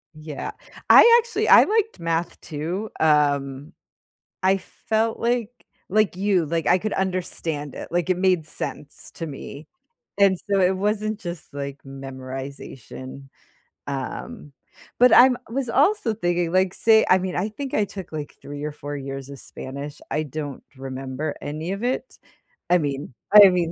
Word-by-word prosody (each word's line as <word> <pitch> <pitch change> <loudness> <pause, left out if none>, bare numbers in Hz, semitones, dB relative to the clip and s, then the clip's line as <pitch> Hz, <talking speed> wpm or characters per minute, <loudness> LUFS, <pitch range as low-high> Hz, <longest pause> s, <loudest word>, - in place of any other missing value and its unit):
Yeah, 155 -2 -6 0.4
I 470 0 +9
actually 470 0 -2
I - - +9
liked 440 +1 0
math 165 0 -2
too, 170 +8 -4
um, 145 -2 +1 0.7
I 190 +1 +4
felt 220 +3 -2
like 235 -1 0 0.4
like 215 -1 +2
you, 190 -4 +1
like, 165 +1 -2
I 180 - +5
could 215 +3 -3
understand 170 -6 -2
it, - - -7
like, 175 0 0
it 185 - +3
made 180 -4 +2
sense 150 0 -7
to 165 - -4
me, 145 +1 -9 0.5
and 195 -1 +5
so 200 - +3
it 185 +1 +3
wasn't 215 +2 -1
just, 175 -2 -7
like, 140 -1 -6
memorization, 135 0 -8 0.6
um, 145 - -6 0.5
but 250 +1 +7
I'm 250 0 +7
was 255 +1 -2
also 285 - +2
thinking, 175 -3 0
like, 185 0 +2
say 220 -1 +4
I 185 - +6
mean, 185 0 -3
I 200 +4 -1
think 270 +5 -6
I 210 - +2
took, 190 -3 -9
like, 150 -2 -6
3 145 0 -7
or 150 - -3
4 145 0 -6
years 135 0 -6
of 140 - -9
Spanish, 140 +2 -8
I 155 - 0
don't 145 -1 -6
remember 135 +2 -5
any 155 +5 -4
of 200 - -6
it. 255 - -2 0.5
I 180 - +7
mean 140 -2 -3 0.2
I 205 -2 +11
mean, 175 -2 0
170 Hz, 155 wpm, -23 LUFS, 145-205 Hz, 0.7 s, I